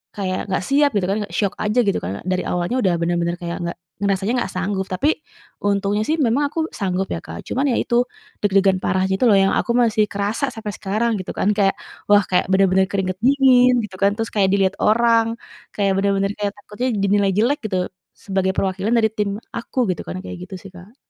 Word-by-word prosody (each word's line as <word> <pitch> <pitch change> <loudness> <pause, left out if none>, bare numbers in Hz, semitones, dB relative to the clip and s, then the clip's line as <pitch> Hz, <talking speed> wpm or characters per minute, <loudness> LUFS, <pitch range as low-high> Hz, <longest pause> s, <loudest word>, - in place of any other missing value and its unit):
kayak 190 -1 -3
nggak 190 -1 -1
siap 285 +6 +3
gitu 195 -3 +1
kan 205 - 0
shock 200 -2 -1
aja 210 +3 +1
gitu 200 - +1
kan, 95 +3 -5
dari 185 0 0
awalnya 180 +9 -1
udah 185 -3 +2
bener-bener 170 0 0
kayak 170 -1 -5
nggak 170 0 -4 0.2
ngerasanya 200 +2 0
nggak 190 - -3
sanggup, 190 +1 -1
tapi 285 +14 0 0.4
untungnya 200 +1 +1
sih 315 - +2
memang 280 +1 +2
aku 325 - -4
sanggup 190 -1 -1
ya, 85 - -3
Kak, 85 0 -9
cuman 275 +3 0
ya - - +1
itu 235 - -1 0.5
deg-degan 195 -2 +3
parah 185 +1 +1
gitu 190 +6 0
loh, 205 - +6
yang 195 0 +3
aku - - 0
masih 220 -3 +3
kerasa 205 +7 -1
sampai 215 -2 -5
sekarang 215 +4 -1
gitu 185 - -7
kan, 205 - +1
kayak 195 -2 +3 0.3
wah 205 -1 +6
kayak 180 - +1
bener-bener 190 0 +3
keringat 185 -2 -1
dingin 255 -1 +5
gitu 200 - -12
kan, 200 +1 +3
terus 225 0 -3
kayak 195 -3 +3
dilihat 195 -1 +2
orang, 230 +1 +3 0.4
kayak 200 -1 +1
bener-bener 195 0 +1
kayak 205 -1 -1
takutnya 210 +5 -4 0.2
dinilai 200 0 +3
jelek 245 +9 +2
gitu 195 -3 -1 0.4
sebagai 190 -1 -1
perwakilan 195 +4 0
dari 220 -2 +3
tim 210 -2 -1 0.2
aku 235 +3 -8 0.2
gitu - - -8
kan, - - -5
kayak - - -7
gitu 190 - -8
sih, 195 +1 -12
Kak. 185 +6 -14
200 Hz, 200 wpm, -21 LUFS, 190-225 Hz, 0.5 s, loh